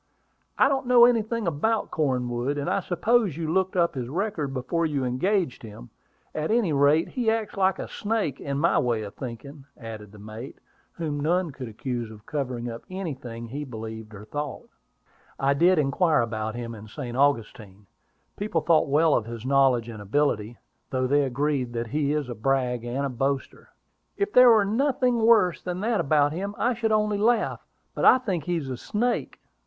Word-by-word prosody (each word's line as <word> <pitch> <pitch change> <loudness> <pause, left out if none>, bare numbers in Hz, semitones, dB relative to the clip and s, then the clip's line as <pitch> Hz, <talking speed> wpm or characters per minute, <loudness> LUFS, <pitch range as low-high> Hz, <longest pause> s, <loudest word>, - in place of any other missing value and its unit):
"I - - +5
don't 270 -2 -1
know 245 -1 +8
anything 230 -2 +1
about 190 +8 0
Cornwood; 130 -2 -1
and 140 - -3
I - - +1
suppose 205 - +1
you 160 -1 -2
looked 190 0 +1
up 170 -2 +2
his 125 -3 -4
record 165 -4 -2
before 135 +6 -2
you 145 -5 0
engaged 165 +5 0
him. 105 - -11 0.4
At 155 0 -2
any 215 -8 +2
rate, 145 +3 +3
he 240 -4 0
acts 225 -1 -1
like 190 -1 +2
a - - -5
snake, 205 - -2
in 140 -1 -3
my 165 +4 +3
way 120 -5 0
of 100 - -8
thinking," 135 +3 -8
added 110 -3 -9
the 105 - -14
mate, 110 +5 -9 0.4
whom 150 -3 -3
none 170 +3 +1
could 130 -2 -7
accuse 120 +1 -4
of 110 -1 -13
covering 125 -5 -3
up 115 -1 -6
anything 135 -11 -6
he 145 +5 -4
believed 110 -4 -8
or 105 +1 -10
thought. 145 +4 -5 0.7
"I 135 +1 +3
did 175 +5 +4
inquire 150 +2 +2
about 110 -1 -3
him 120 -1 -5
in 110 -1 -10
St. 120 +1 -6
Augustine: 110 -7 -1 0.5
people 200 -5 -1
thought 160 -2 +3
well 155 +2 +4
of 110 - +1
his 115 0 -7
knowledge 130 -4 +3
and 110 -3 -8
ability, 115 -1 0 0.3
though 130 -1 0
they 145 +3 +3
agree 140 +1 0
that 120 -1 -4
he 145 +1 0
is 150 -3 -1
a 120 - -4
brag 125 0 0
and 125 +4 -2
a - - -1
boaster." 135 +2 -3 0.5
"If 400 +1 -1
there 250 0 +8
were 220 -3 +5
nothing 250 +2 +1
worse 220 -6 +4
than 180 0 -4
that 225 0 +1
about 145 0 +2
him, 200 +4 -4
I 245 +2 +1
should 225 -1 -1
only 210 -1 +1
laugh. 225 +1 +1 0.3
But - - -1
I - - +8
think 190 - -3
he 175 - 0
is 145 -5 -4
a 130 -2 -4
snake." 240 - -2
145 Hz, 190 wpm, -25 LUFS, 120-190 Hz, 0.7 s, know